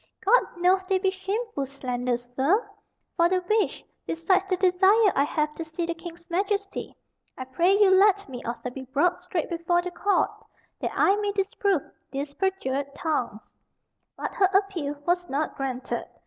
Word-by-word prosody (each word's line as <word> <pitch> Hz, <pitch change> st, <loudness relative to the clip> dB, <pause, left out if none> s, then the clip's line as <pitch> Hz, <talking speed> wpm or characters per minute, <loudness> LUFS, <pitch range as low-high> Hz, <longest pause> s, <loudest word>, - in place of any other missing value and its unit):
God -, -, +6 dB, 0.2 s
knoweth 370 Hz, +2 st, +2 dB
they 385 Hz, -, +3 dB
be 380 Hz, 0 st, +1 dB
shameful 390 Hz, -, -3 dB
slanders, 250 Hz, -2 st, -3 dB
sir; 355 Hz, -, +2 dB, 0.5 s
for 340 Hz, -1 st, +4 dB
the 370 Hz, -, +2 dB
which, 425 Hz, +4 st, 0 dB, 0.2 s
besides 370 Hz, +4 st, +1 dB
the 375 Hz, -1 st, 0 dB
desire 380 Hz, +3 st, +4 dB
I 275 Hz, -, +4 dB
have 300 Hz, +1 st, -1 dB
to 330 Hz, -, -5 dB
see 320 Hz, +2 st, -4 dB
the 340 Hz, -, -2 dB
King's 340 Hz, 0 st, -11 dB
Majesty, 400 Hz, +3 st, -2 dB, 0.4 s
I 260 Hz, -, -5 dB
pray 345 Hz, +9 st, +2 dB
you 400 Hz, -2 st, +6 dB
let 400 Hz, +1 st, +4 dB
me 250 Hz, -3 st, -8 dB
also 240 Hz, +1 st, -4 dB
be 260 Hz, +1 st, -8 dB
brought 345 Hz, +7 st, +1 dB
straight 360 Hz, -2 st, -2 dB
before 345 Hz, +1 st, 0 dB
the 360 Hz, -, -4 dB
court 405 Hz, +3 st, +1 dB, 0.5 s
that -, -, -1 dB
I 390 Hz, -, +4 dB
may 410 Hz, -1 st, 0 dB
disprove 390 Hz, -4 st, 0 dB, 0.3 s
these 280 Hz, +1 st, -4 dB
perjured 280 Hz, -7 st, -2 dB
tongues." 290 Hz, -, -3 dB, 0.6 s
But -, -, -4 dB
her 380 Hz, -3 st, +3 dB
appeal 365 Hz, -8 st, +1 dB
was 350 Hz, 0 st, 0 dB
not 290 Hz, +3 st, -1 dB
granted. 260 Hz, -2 st, -3 dB
350 Hz, 165 wpm, -26 LUFS, 280-390 Hz, 0.6 s, God